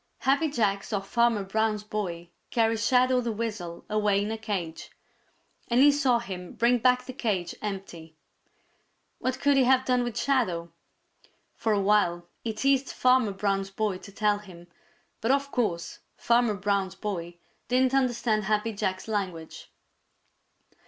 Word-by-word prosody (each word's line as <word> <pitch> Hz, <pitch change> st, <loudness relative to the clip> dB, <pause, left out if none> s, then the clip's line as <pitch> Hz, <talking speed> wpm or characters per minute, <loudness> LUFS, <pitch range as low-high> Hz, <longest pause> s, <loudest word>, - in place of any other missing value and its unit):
Happy 280 Hz, +4 st, +2 dB
Jack 205 Hz, -7 st, 0 dB
saw 205 Hz, -, -2 dB
Farmer 230 Hz, +1 st, +1 dB
Brown's 215 Hz, +1 st, 0 dB
boy 180 Hz, -5 st, -4 dB, 0.2 s
carry 225 Hz, -1 st, +2 dB
Shadow 250 Hz, +2 st, +3 dB
the 235 Hz, -1 st, -2 dB
Weasel 205 Hz, -6 st, -5 dB
away 210 Hz, -1 st, +1 dB
in 210 Hz, -, -3 dB
a 225 Hz, -, -3 dB
cage, 185 Hz, -7 st, -4 dB, 0.8 s
and 240 Hz, +1 st, +2 dB
he 290 Hz, +2 st, +7 dB
saw 275 Hz, -4 st, +2 dB
him 185 Hz, -6 st, -7 dB
bring 240 Hz, +1 st, +2 dB
back 250 Hz, +1 st, +3 dB
the 255 Hz, -, -7 dB
cage 200 Hz, -9 st, -2 dB
empty. 190 Hz, -6 st, -6 dB, 1.0 s
What 255 Hz, 0 st, -2 dB
could 285 Hz, -1 st, +3 dB
he 265 Hz, -, +5 dB
have 260 Hz, 0 st, +4 dB
done 250 Hz, -1 st, +2 dB
with 240 Hz, -2 st, -4 dB
Shadow? 185 Hz, -13 st, 0 dB, 0.8 s
For 225 Hz, -, -1 dB
a 205 Hz, -, +2 dB
while 195 Hz, -4 st, +2 dB, 0.2 s
he 230 Hz, -, -1 dB
teased 270 Hz, +4 st, +1 dB
Farmer 255 Hz, -4 st, +3 dB
Brown's 195 Hz, 0 st, -1 dB
boy 195 Hz, -1 st, -2 dB
to 200 Hz, -, -12 dB
tell 205 Hz, 0 st, +1 dB
him, 180 Hz, -4 st, -13 dB, 0.6 s
but 225 Hz, -, -1 dB
of 280 Hz, +1 st, +1 dB
course 195 Hz, -9 st, -2 dB, 0.2 s
Farmer 235 Hz, -2 st, +2 dB
Brown's 195 Hz, -1 st, -1 dB
boy 175 Hz, -4 st, -5 dB, 0.3 s
didn't 255 Hz, +1 st, +2 dB
understand 240 Hz, -5 st, +1 dB
Happy 215 Hz, +2 st, 0 dB
Jack's 190 Hz, -1 st, -3 dB
language. 185 Hz, -7 st, -4 dB
215 Hz, 150 wpm, -27 LUFS, 195-245 Hz, 1.0 s, he